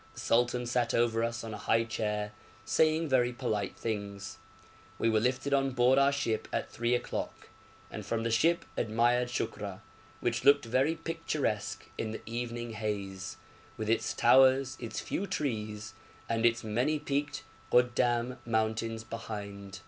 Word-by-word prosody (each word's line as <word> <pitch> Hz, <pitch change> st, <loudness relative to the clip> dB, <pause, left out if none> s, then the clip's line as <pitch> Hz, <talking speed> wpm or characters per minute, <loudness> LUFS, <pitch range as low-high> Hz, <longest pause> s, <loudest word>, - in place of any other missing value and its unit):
The -, -, -9 dB
sultan 120 Hz, +1 st, +2 dB
sat 120 Hz, 0 st, +1 dB
over 115 Hz, -1 st, +2 dB
us 115 Hz, +1 st, -2 dB
on 110 Hz, -1 st, -5 dB
a -, -, -6 dB
high 115 Hz, 0 st, +2 dB
chair, 105 Hz, -2 st, -2 dB, 0.3 s
saying 160 Hz, +6 st, +3 dB
very 125 Hz, -3 st, +3 dB
polite 110 Hz, -6 st, -2 dB
things. 100 Hz, -3 st, -4 dB, 0.6 s
We 115 Hz, -, +2 dB
were 110 Hz, -, +4 dB
lifted 130 Hz, +4 st, 0 dB
on 135 Hz, -1 st, +3 dB
board 125 Hz, +2 st, +5 dB
our 140 Hz, 0 st, +5 dB
ship 115 Hz, -6 st, -1 dB
at -, -, -2 dB
three 120 Hz, +1 st, +1 dB
o'clock, 120 Hz, -, -4 dB, 0.4 s
and -, -, -6 dB
from 115 Hz, -1 st, -2 dB
the 115 Hz, -, 0 dB
ship 165 Hz, +10 st, +3 dB
admired 120 Hz, +3 st, +2 dB
Shukra, 120 Hz, -, -4 dB, 0.4 s
which -, -, -1 dB
looked 140 Hz, -3 st, +6 dB
very 130 Hz, +7 st, +2 dB
picturesque 150 Hz, -, -2 dB
in 110 Hz, -, -1 dB
the 110 Hz, -, -5 dB
evening 120 Hz, 0 st, -4 dB
haze, 100 Hz, -3 st, -4 dB, 0.4 s
with 110 Hz, 0 st, -1 dB
its 110 Hz, -1 st, 0 dB
towers, 130 Hz, +1 st, +5 dB
its 115 Hz, -2 st, -4 dB
few 200 Hz, -, -3 dB
trees, 110 Hz, -, -3 dB, 0.3 s
and 115 Hz, 0 st, +3 dB
its 120 Hz, 0 st, 0 dB
many 125 Hz, +8 st, +1 dB
peaked 145 Hz, 0 st, -2 dB, 0.3 s
Goddam 120 Hz, 0 st, +2 dB
mountains 110 Hz, 0 st, -1 dB
behind. 100 Hz, -3 st, -7 dB
115 Hz, 150 wpm, -31 LUFS, 110-130 Hz, 0.6 s, looked